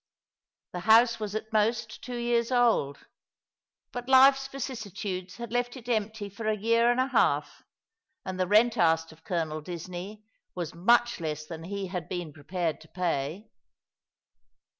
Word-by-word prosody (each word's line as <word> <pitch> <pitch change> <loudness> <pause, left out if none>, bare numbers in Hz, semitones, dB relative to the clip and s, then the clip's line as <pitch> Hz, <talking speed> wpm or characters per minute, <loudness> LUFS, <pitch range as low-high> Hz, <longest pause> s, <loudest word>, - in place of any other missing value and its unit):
The 180 - -4
house 230 +4 +5
was 210 -1 -4
at 220 +1 -5
most 220 +1 0
two 245 -1 -5
years 235 0 0
old; 230 - +2 0.9
but 245 +1 -6
life's 270 +1 +6
vicissitudes 210 -8 -5
had 235 -2 -7
left 245 +1 -1
it 240 -2 -12
empty 215 -2 -1
for 200 +3 -6
a 215 -1 +1
year 230 +3 +3
and 245 +1 +2
a 260 +1 +1
half, 270 - +1 0.6
and 185 -1 -5
the 185 - +1
rent 220 +4 +4
asked 165 -1 +3
of 160 +1 -18
Colonel 160 -3 -2
Disney 180 +5 -7 0.3
was 175 -3 -4
much 235 +7 +3
less 155 -2 -4
than 165 0 -8
he 200 +1 -4
had 180 -4 -5
been 175 -4 -4
prepared 160 +2 -3
to 160 - -15
pay. 175 +3 -3
210 Hz, 155 wpm, -28 LUFS, 175-235 Hz, 0.9 s, life's